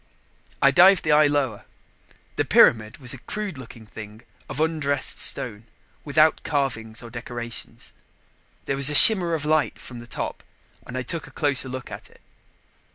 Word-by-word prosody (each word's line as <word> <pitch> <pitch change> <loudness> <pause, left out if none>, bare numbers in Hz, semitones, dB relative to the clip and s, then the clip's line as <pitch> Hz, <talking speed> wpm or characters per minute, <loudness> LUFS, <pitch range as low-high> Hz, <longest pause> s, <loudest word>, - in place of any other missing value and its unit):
I - - +5
dived 185 +1 +5
the 155 - 0
eye 150 0 +5
lower. 140 -7 -2 0.7
The - - 0
pyramid 110 0 +3
was 130 -4 0
a 130 - -10
crude 210 - -6
looking 115 -2 -13
thing 110 +1 -12 0.3
of 135 - -7
undressed 150 -4 -1
stone, 110 -2 -1 0.4
without 155 +2 +2
carvings 115 -6 -3
or 120 - -11
decorations. 120 -1 -7 0.7
There 135 - -2
was 140 +1 +5
a 150 - -2
shimmer 175 +1 +6
of 150 -2 -5
light 155 0 0
from 120 -2 -11
the 120 - -12
top - - -6 0.5
and 125 - -7
I 130 - -3
took 160 +6 -5
a - - -13
closer 140 -3 +1
look 130 0 -8
at - - -10
it. - - -23
135 Hz, 165 wpm, -23 LUFS, 120-155 Hz, 0.7 s, shimmer